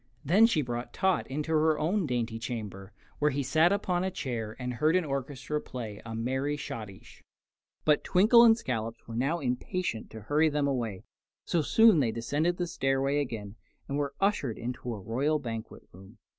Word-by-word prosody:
Then 200 +10 +6
she 155 -10 +1
brought 120 0 -5
Tot 190 -1 +1
into 150 +4 -3
her 155 0 +3
own 170 +4 0
dainty 120 -3 -2
chamber, 105 -5 -6 0.3
where 150 - +3
he 140 0 -1
sat 160 +6 +3
upon 185 -3 0
a 190 - 0
chair 120 - -4
and 125 -1 -4
heard 155 +7 +2
an 185 -2 +2
orchestra 140 +1 -3
play 110 -5 -7
a 115 0 -6
merry 130 +5 -1
schottische. 105 -8 -8 0.6
But 150 -1 +3
Twinkle 215 +6 +6
and 225 -1 +7
Scollops 115 - -4
were 115 - -7
now 135 +8 +1
impatient 125 0 -2
to 110 - -9
hurry 150 +8 +2
them 145 -1 0
away, 115 -8 -2 0.4
so 170 - +1
soon 220 +3 +5
they 120 -5 +2
descended 145 +10 -1
the 175 - -1
stairway 135 -3 0
again 115 -6 -5 0.3
and 140 - -3
were 140 -1 -2
ushered 195 - 0
into 125 +1 -5
the 115 - -2
royal 130 +10 0
banquet 115 -6 -6
room. 95 +2 -15
135 Hz, 180 wpm, -29 LUFS, 115-160 Hz, 0.6 s, and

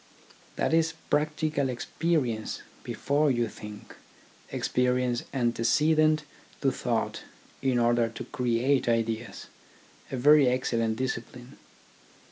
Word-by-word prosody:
That - - 0
is 165 0 +2 0.2
practical 150 -2 +1
experience 125 -3 -1 0.2
before 145 +2 0
you 120 -3 +1
think, 105 -1 -10 0.5
experience 125 -1 0
ante 120 -3 0
cedent 155 +5 +3 0.4
to 135 - +3
thought 115 -3 -2 0.4
in 130 -2 +1
order 120 -1 +3
to 115 - -7
create 125 +2 +1
ideas, 115 0 -1 0.7
a 130 - -2
very 145 +2 +6
excellent 115 -3 0
discipline. 125 0 -5
125 Hz, 100 wpm, -28 LUFS, 115-145 Hz, 0.7 s, very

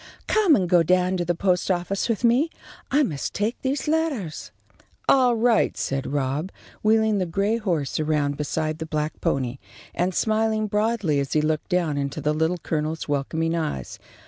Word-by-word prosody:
"Come 410 -8 +4
and 185 -7 +1
go 175 -1 +5
down 180 +2 +2
to 175 - -1
the 175 +1 0
post 180 +1 +1
office 185 +4 -1
with 230 0 -1
me. 245 +7 +3 0.4
I 295 +2 +3
must 150 - -3
take 215 +3 0
these 270 +2 -2
lettahs." 300 - -1 0.6
"All 255 -3 +5
right," 230 0 +2
said 135 0 -2
Rob, 145 +5 -1 0.3
wheeling 220 -1 +3
the 185 - -1
gray 200 +6 0
horse 170 -12 -1
around 150 -2 0
beside 155 +2 -2
the 160 - -5
black 155 0 -3
pony, 130 -1 -1 0.3
and 180 +1 -1
smiling 220 0 +1
broadly 210 -7 +1
as 140 -1 -2
he 155 - +3
looked 155 0 -1
down 170 -6 +1
into 140 -1 -3
the 150 0 0
Little 160 +3 0
Colonel's 160 -1 -3
welcoming 160 +3 -1
eyes. 155 - -3
175 Hz, 170 wpm, -24 LUFS, 155-220 Hz, 0.6 s, go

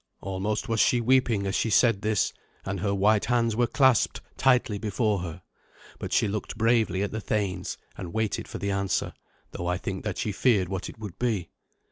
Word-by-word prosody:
Almost 95 +3 -2
was 115 -1 0
she 120 - +4
weeping 120 -4 +2
as 95 - -1
she 115 - +1
said 115 -2 +4
this, 110 -2 +1 0.3
and 95 -1 -3
her 100 +2 0
white 100 +2 +3
hands 115 -2 +1
were 120 +1 +2
clasped 130 -3 +3 0.2
tightly 125 -6 +2
before 105 0 0
her. 90 0 -7 0.6
But - - -5
she - - +3
looked 105 +1 -4
bravely 115 -4 +2
at 100 - -2
the 110 - -4
thanes, 100 -4 -2 0.2
and 90 -3 -7
waited 110 0 -1
for - - -6
the 100 +2 -2
answer, 100 -1 -1 0.4
though 85 - -5
I 90 +1 +1
think 95 +1 -5
that 105 -4 -3
she 105 - -1
feared 100 -3 +2
what 95 -1 -4
it - - -11
would 105 -4 -8
be. 110 -9 -1
105 Hz, 195 wpm, -27 LUFS, 95-115 Hz, 0.6 s, she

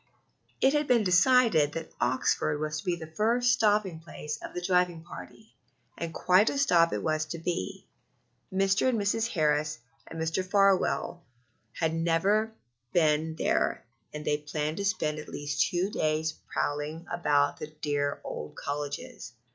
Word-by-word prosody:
It 270 - +4
had 295 0 +1
been 240 -3 +4
decided 185 - +4
that 165 -1 -6
Oxford 130 +4 +1
was 155 0 -2
to - - -10
be 180 -2 +1
the 165 -2 -8
first 240 +4 +3
stopping 210 -7 +2
place 150 -2 -7
of - - -8
the 180 - -3
driving 180 -3 +1
party, 220 +5 -12 0.4
and 170 -1 -5
quite 185 +5 +3
a - - -3
stop 170 -12 +4
it - - -3
was 155 0 0
to 170 - -5
be. 165 - -4 0.7
Mr. 195 +5 +2
and 235 -3 0
Mrs. 215 +3 +1
Harris 155 -6 0 0.3
and 165 - -8
Mr. 160 +3 -1
Farwell 195 -2 +2 0.5
had 160 -1 -1
never 170 +7 +1 0.4
been 160 -1 +2
there, - - 0 0.3
and 150 0 -7
they 150 - +1
planned 150 +1 -3
to 200 - -2
spend 155 -6 0
at 150 - -9
least 145 -1 -1
two 185 +3 -1
days 155 -1 0 0.2
prowling 150 +3 -2
about 145 -4 +2
the 155 - -5
dear 145 -2 -2
old 75 - -6
colleges. 145 -4 -5
165 Hz, 155 wpm, -28 LUFS, 150-195 Hz, 0.7 s, It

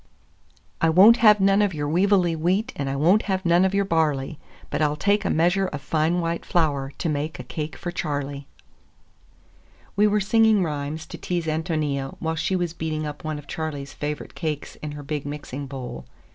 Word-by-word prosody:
IV - - -36 0.2
"I 165 - +4
won't 200 +8 +7
have 210 -2 +6
none 195 +1 +4
of 200 -5 +1
your 145 -1 -2
weevily 180 +1 +3
wheat, 185 +9 0
and 140 -1 -3
I 135 - -2
won't 175 +9 +4
have 190 -1 -1
none 170 +1 +4
of 190 +1 +1
your 200 0 +2
barley, 155 -4 0 0.3
But 150 - -1
I'll 150 -1 +2
take 200 +7 +1
a - - -1
measure 180 +4 +2
of 150 - -5
fine 160 +5 0
white 165 0 -2
flour, 145 -5 0
to - - -2
make 150 +1 -2
a 125 - -7
cake 155 +5 -5
for 175 - -5
Charley." 145 -5 -4 1.5
WE 210 +2 +4
were 210 0 +2
singing 215 0 +4
rhymes 150 0 -4
to - - -9
tease 175 -2 -2
Ántonia 155 -4 -2
while 160 -1 -2
she 165 +4 -1
was 175 -3 -1
beating 155 -2 -3
up 150 0 -7
one 155 -1 -3
of 145 - -10
Charley's 145 -3 -5
favorite 150 0 -5
cakes 155 -4 -4
in 150 -1 -6
her 145 0 -8
big 145 0 -3
mixing 145 -1 -6
bowl. 125 - -7
160 Hz, 200 wpm, -24 LUFS, 145-185 Hz, 1.5 s, won't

